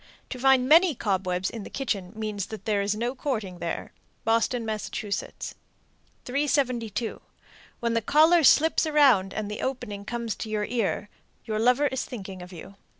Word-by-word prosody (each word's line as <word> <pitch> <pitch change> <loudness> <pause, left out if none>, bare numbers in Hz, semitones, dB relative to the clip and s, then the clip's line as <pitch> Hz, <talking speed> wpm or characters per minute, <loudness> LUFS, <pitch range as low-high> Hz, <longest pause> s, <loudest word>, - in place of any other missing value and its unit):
To 255 - -5
find 265 -1 +4
many 330 +2 +6
cobwebs 190 -3 -1
in 230 - -6
the - - -8
kitchen 200 -9 -3
means 215 -3 -3
that 220 - -8
there 210 -3 +1
is 200 +1 0
no 240 +3 -2
courting 220 -10 -3
there. 170 0 -4 0.3
Boston, 230 +1 +1
Mass. 215 -1 -3
372. 245 +3 -3 0.6
When 235 -1 0
the 230 - +1
collar 315 +8 +5
slips 320 +3 +5
around 265 -11 +4
and 215 -1 -3
the 210 - -5
opening 210 -6 -4
comes 235 0 -3
to 220 - -5
the 215 +2 -2
ear, 215 -3 -1 0.4
your 215 -1 -2
lover 250 +5 +3
is 265 -2 -1
thinking 195 -6 -8
of 180 +1 -10
you. 190 +3 -11
225 Hz, 160 wpm, -26 LUFS, 200-260 Hz, 0.6 s, many